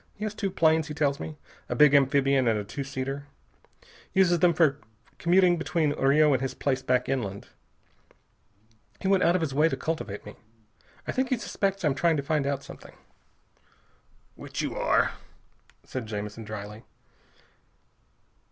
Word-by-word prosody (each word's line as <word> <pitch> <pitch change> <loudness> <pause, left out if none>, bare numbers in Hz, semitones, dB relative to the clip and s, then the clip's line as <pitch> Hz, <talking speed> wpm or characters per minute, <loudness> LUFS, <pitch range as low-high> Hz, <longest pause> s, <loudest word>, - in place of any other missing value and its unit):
He 210 - -8
has 215 - -3
two 200 -2 -2
planes, 160 -3 +2
he 150 - -6
tells 145 -2 0
me, 155 -1 -7 0.3
a - - -1
big 150 -1 +6
amphibian 135 -1 +3
and 110 -2 +2
a 105 - -3
two 140 +7 -5
seater. 135 +1 -5 0.9
Uses 180 -3 +4
them 175 +1 +5
for 155 -4 +2 0.4
commuting 175 0 +4
between 165 -2 0
Rio 145 +2 +4
and 130 - +1
his 135 - -3
place 135 -2 -1
back 125 0 +1
inland. 100 -7 -3 1.5
He 190 - -3
went 195 -1 +3
out 170 +1 +4
of 185 - +1
his 150 -4 -2
way 150 +4 +3
to 135 - -3
cultivate 135 -8 -4
me. 105 - -11 0.7
I - - -2
think 260 0 -1
he 255 - +1
suspects 195 -4 -2
I'm 145 - +3
trying 165 +2 +2
to 140 - -2
find 150 -1 0
out 140 -1 -2
something." - - -12 1.4
"Which - - -6
you - - -3
are," - - +2 0.7
said 125 -4 -6
Jamison 105 +1 -6
dryly. 105 +1 -8
145 Hz, 160 wpm, -27 LUFS, 130-170 Hz, 1.5 s, big